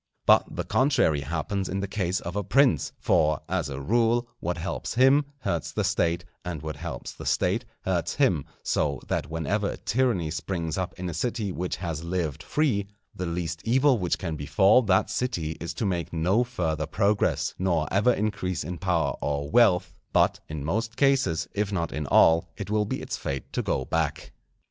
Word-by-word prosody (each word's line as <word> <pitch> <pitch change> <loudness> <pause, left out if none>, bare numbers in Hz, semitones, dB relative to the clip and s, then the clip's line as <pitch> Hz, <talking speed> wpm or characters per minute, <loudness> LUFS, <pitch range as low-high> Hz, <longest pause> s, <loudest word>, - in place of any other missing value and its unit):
But - - +4
the - - -2
contrary 130 - +2
happens 85 +6 -2
in 95 - -2
the 100 - -2
case 95 -2 -1
of 90 +2 -6
a 105 - 0
prince; 125 - +3
for, 75 -1 +2
as - - -1
a 70 -1 -5
rule, 115 - +2
what 90 +1 -2
helps 90 +6 -4
him 135 +4 +5 0.2
hurts 85 -8 -2
the 105 - -1
State, 85 -3 0 0.2
and 85 -4 -5
what 80 -1 -4
helps - - -6
the - - -10
State 105 +7 +1 0.2
hurts 90 -3 -1
him; 95 - +2 0.2
so 70 -3 0
that - - -1
whenever 95 +6 -1
a - - -5
tyranny 115 -10 0
springs 80 0 -3
up 95 -2 -3
in 90 0 -4
a 85 - -3
city 110 +3 -2
which 90 0 -3
has 85 -2 -4
lived 85 -4 -2
free, 120 -10 0 0.3
the 90 - -4
least 85 -2 -3
evil 130 +1 +3
which 90 -2 0
can 85 -4 -4
befall 95 - +4
that 100 -5 +2
city 90 -12 -1
is 85 - -4
to 115 - -2
make 90 -4 -1
no 90 +8 +2
further 80 -11 -2
progress, 100 0 +1
nor 85 -5 +1
ever 105 +6 +4
increase 100 -6 -1
in 85 +2 -5
power 85 -6 +1
or 70 0 -2
wealth; 90 -6 +4 0.2
but - - +3
in 75 -2 -5
most 115 +8 -1
cases, 135 - +2
if 105 0 -1
not 85 -4 -1
in 75 -2 -3
all, 80 +3 +5
it 105 -1 -5
will 105 0 +2
be - - -4
its - - -4
fate 70 -1 -5
to - - 0
go 65 - -1
back. - - -2
90 Hz, 190 wpm, -26 LUFS, 80-105 Hz, 0.3 s, him